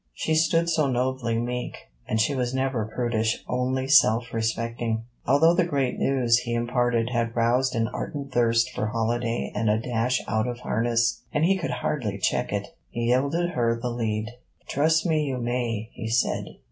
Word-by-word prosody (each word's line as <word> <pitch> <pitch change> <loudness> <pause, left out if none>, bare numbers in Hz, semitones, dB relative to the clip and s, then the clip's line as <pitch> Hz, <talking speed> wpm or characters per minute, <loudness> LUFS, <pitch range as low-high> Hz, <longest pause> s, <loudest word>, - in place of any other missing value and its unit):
She 160 - -1
stood 165 +1 +3
so 155 -3 +2
nobly 125 -2 0
meek. 125 +1 -3 0.3
And 110 - 0
she 115 +6 +2
was 125 -1 -1
never 130 -4 0
prudish, 110 -1 -1
only 130 +1 -1
self 120 -4 +4
respecting. 115 0 -1 0.2
Although 150 +6 +5
the 175 0 +3
great 140 -6 -1
news 125 -3 +3
he 120 -1 -3
imparted 120 0 +1
had 115 -1 -1
roused 120 +2 +2
an 115 -1 +1
ardent 140 +4 -5
thirst 115 0 +2
for 110 - -2
holiday 115 +1 -1
and 110 +1 0
a 105 - +3
dash 120 +2 0
out 110 +2 0
of 120 0 -5
harness, 115 0 +1
and 150 +2 +2
he 195 +3 +4
could 175 -7 -3 0.2
hardly 110 -9 -1
check 95 - 0
it, - - -3 0.2
he 120 - -4
yielded 140 +8 +1
her 115 -6 0
the 120 +1 -3
lead. 110 -2 -2 0.4
'Trust 160 +4 +2
me 155 -3 +2
you 135 -3 -2
may,' 120 -2 -2
he 110 - -5
said. 115 +1 +1
120 Hz, 175 wpm, -25 LUFS, 115-135 Hz, 0.4 s, Although